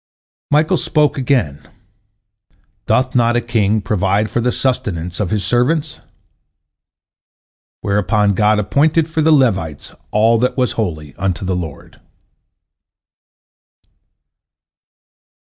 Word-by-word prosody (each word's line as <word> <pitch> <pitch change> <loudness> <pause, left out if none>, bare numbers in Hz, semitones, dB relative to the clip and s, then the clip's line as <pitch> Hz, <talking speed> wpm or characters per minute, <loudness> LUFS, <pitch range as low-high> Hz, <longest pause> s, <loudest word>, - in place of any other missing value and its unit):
Michael 150 +2 +2
spoke 150 -2 +1
again, 120 - 0 1.3
"Doth 130 0 +1
not 120 -1 +3
a - - +3
king 110 -3 0
provide 100 +1 0
for 120 - 0
the 125 +1 +1
sustenance 90 -11 -2
of 105 -5 -1
his 105 0 -1
servants?" 145 +4 0 1.8
whereupon 100 +1 +1
God 105 +2 +2
appointed 150 +10 +1
for 160 -1 -2
the 160 +1 +3
Levites 95 - 0 0.2
all 115 +2 +3
that 125 +3 0
was 125 -1 +1
holy 80 -10 -4
unto 95 -1 -2
the 95 0 -1
Lord. 80 -5 -8
110 Hz, 105 wpm, -17 LUFS, 95-130 Hz, 1.8 s, not